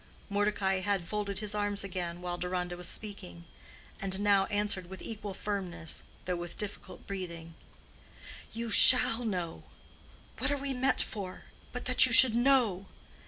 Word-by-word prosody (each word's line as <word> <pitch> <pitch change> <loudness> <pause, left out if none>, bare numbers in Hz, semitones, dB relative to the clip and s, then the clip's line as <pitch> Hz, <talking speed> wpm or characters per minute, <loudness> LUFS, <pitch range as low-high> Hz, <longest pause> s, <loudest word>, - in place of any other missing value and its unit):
Mordecai 200 -2 -1
had 190 -3 -3
folded 205 -1 -4
his 210 0 -4
arms 205 -1 -2
again 180 -2 -6
while 175 0 -4
Deronda 180 0 -4
was 175 0 -7
speaking, 195 -5 -7 0.6
and 190 0 -4
now 200 -1 +2
answered 205 -4 -3
with 190 - -10
equal 210 -3 -8
firmness, 180 -6 -4 0.2
though 180 - -2
with 175 0 -8
difficult 210 -1 -8
breathing, 170 -4 -8 1.0
"You 230 0 -5
shall 245 +1 +7
know. 180 -7 -4 0.8
What - - 0
are 285 - -1
we 275 0 -4
met 260 +1 +1
for, 195 -4 -8 0.3
but 250 - -7
that 255 0 +7
you 240 - +2
should 255 -1 +11
know. 235 -6 +1
200 Hz, 150 wpm, -29 LUFS, 180-215 Hz, 1.0 s, should